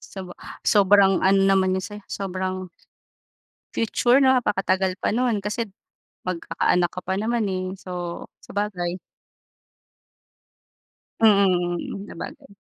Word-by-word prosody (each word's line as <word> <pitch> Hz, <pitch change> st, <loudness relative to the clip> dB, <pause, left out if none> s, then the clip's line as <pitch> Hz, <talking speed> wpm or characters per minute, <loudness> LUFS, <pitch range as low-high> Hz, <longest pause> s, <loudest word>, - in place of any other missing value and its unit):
Saba 185 Hz, -2 st, -7 dB, 0.3 s
sobrang 200 Hz, -1 st, +5 dB
ano 195 Hz, +1 st, +4 dB
naman 190 Hz, -1 st, +3 dB
'yon 190 Hz, -, -2 dB
sa 205 Hz, -, -7 dB
'yo -, -, -22 dB
sobrang 185 Hz, -1 st, -4 dB, 1.0 s
future 240 Hz, +3 st, +3 dB
napakatagal 190 Hz, -7 st, +2 dB
pa -, -, +1 dB
nun. 235 Hz, -2 st, +1 dB
Kasi 220 Hz, +2 st, -2 dB, 0.6 s
magkaka-anak 175 Hz, 0 st, 0 dB
ka 180 Hz, -, -4 dB
pa 190 Hz, -, -1 dB
naman 230 Hz, 0 st, 0 dB
eh, 185 Hz, 0 st, -3 dB
so 175 Hz, -2 st, -6 dB, 0.2 s
sabagay. 185 Hz, -3 st, -3 dB, 2.2 s
Mm. 195 Hz, -3 st, +2 dB
Mm. -, -, -15 dB
Sabagay. 280 Hz, -1 st, -9 dB
190 Hz, 110 wpm, -24 LUFS, 185-210 Hz, 2.2 s, sobrang